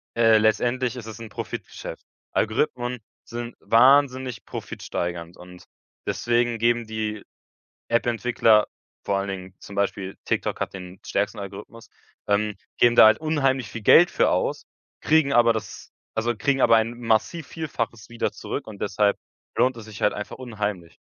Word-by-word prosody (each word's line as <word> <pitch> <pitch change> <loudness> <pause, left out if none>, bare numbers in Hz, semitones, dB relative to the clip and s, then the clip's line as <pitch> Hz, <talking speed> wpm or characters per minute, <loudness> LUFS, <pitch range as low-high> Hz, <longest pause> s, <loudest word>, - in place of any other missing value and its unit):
äh, 115 -1 +5
letztendlich 120 +4 +1
ist 120 -3 -7
es 110 -1 -9
'n 115 -2 -8
Profitgeschäft. - - -7 0.3
Algorithmen 120 +1 0 0.2
sind 120 0 -7
wahnsinnig 130 0 +3
profitsteigernd 85 -1 -5
und 90 0 -13 0.4
deswegen 120 0 +1
geben 120 +1 +2
die 110 -1 -4 0.7
App-Entwickler 115 -2 +3 0.4
vor 100 -1 0
allen 100 0 -2
Dingen 95 -1 -6
zum 100 - -11
Beispiel 100 -1 -2
TikTok - - -1
hat - - -2
den 90 0 -9
stärksten 100 +1 -1
Algorithmus, 100 +3 -9 0.4
ähm, 105 0 +1 0.2
geben 120 0 +5
da - - +9
halt 110 - +4
unheimlich 135 -7 0
viel 115 +1 -7
Geld 175 +11 +7
für - - +2
aus, - - -1 0.4
kriegen 155 -3 +3
aber 120 -1 +5
das 110 -2 -7 0.3
also 115 +1 0
kriegen 135 +3 +1
aber 115 - +6
ein 115 +2 -1
massiv 120 +8 0
Vielfaches 120 -8 -4
wieder 120 - -2
zurück - - -6
und 105 -2 -9
deshalb 100 0 +1 0.4
lohnt 130 0 +3
es 110 - -9
sich 105 -2 -11
halt - - +3
einfach 105 - -6
unheimlich. 105 -8 -4
115 Hz, 150 wpm, -24 LUFS, 105-120 Hz, 0.7 s, da